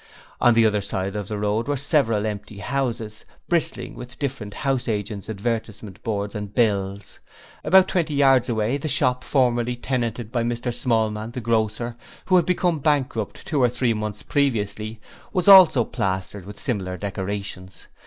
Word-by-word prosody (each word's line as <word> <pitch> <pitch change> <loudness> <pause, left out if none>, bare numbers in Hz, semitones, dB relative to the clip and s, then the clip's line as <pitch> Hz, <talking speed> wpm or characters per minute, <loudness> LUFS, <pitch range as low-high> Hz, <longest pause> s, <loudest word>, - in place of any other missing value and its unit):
On 120 -1 +5
the 115 0 +5
other 105 -1 +2
side 95 0 -3
of 105 -2 -4
the 105 - -4
road 105 +3 -1
were 145 -1 0
several 125 -7 +2
empty 105 -1 -5
houses, 115 -3 -3 0.2
bristling 170 -3 -1
with 125 +1 -10
different 125 -8 -4
house 135 -2 -1
agents' 105 -1 -3
advertisement 110 -2 -4
boards 105 -2 -3
and 105 -2 -6
bills. 100 -3 0 0.4
About 190 0 +6
twenty 165 -5 0
yards 135 -3 +4
away, 115 +3 0
the 145 - -4
shop 130 -3 +1
formerly 120 -3 +1
tenanted 120 -3 -3
by 120 -2 0
Mr 120 +1 -2
Smallman, 110 -2 -1
the 125 - -4
grocer, 115 +1 -1 0.3
who 185 - +3
had 175 -3 +4
become 180 -3 +1
bankrupt 130 -7 -1
two 145 -4 0
or 125 - +5
three 120 0 0
months 105 -1 -4
previously, 110 -5 -1 0.3
was 185 -2 0
also 185 -10 +9
plastered 95 -3 -3
with 105 - -9
similar 95 -8 -3
decorations. 100 -2 -5
115 Hz, 160 wpm, -23 LUFS, 105-130 Hz, 0.4 s, also